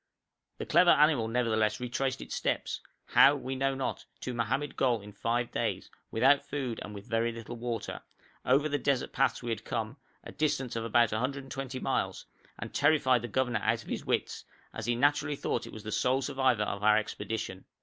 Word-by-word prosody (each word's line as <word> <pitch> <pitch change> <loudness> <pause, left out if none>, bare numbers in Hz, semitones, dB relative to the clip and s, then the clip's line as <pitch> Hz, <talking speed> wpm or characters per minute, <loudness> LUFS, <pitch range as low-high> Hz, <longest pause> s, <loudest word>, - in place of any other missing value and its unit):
The - - -5
clever 175 +3 +5
animal 150 -7 +5
nevertheless 110 -2 +1
retraced 130 +2 -2
its - - -7
steps, - - -1 0.3
how 145 - +7
we 130 -1 -4
know 135 +1 0
not, 135 -1 -3 0.2
to 125 - -4
Mohammed 130 +5 -1
Gol 125 -4 +2
in 105 0 -12
five 115 +3 -1
days, - - -2 0.2
without 135 +5 +4
food 130 -5 -4
and 105 - -8
with 100 0 -9
very 115 +1 0
little 115 +1 -7
water, 115 -2 -4 0.4
over 140 +4 +3
the 145 -1 -1
desert 140 -3 0
paths - - +1
we 120 - -2
had 110 -1 -3
come 115 +3 -3 0.3
a - - -9
distance 135 -5 -1
of 115 0 -2
about 115 0 +3
120 135 +2 -3
miles - - -1 0.3
and - - -7
terrified 140 -4 +3
the 120 - -4
governor 125 -1 0
out - - +1
of - - -13
his - - -3
wits, - - -1 0.3
as 110 - -5
he 120 - +2
naturally 145 +3 +2
thought 120 - -2
it - - -9
was 110 - -9
the 110 - -5
sole 130 +5 +1
survivor 130 -5 +2
of 100 -1 -3
our 105 0 +5
expedition. 105 -2 -4
125 Hz, 190 wpm, -30 LUFS, 115-135 Hz, 0.4 s, how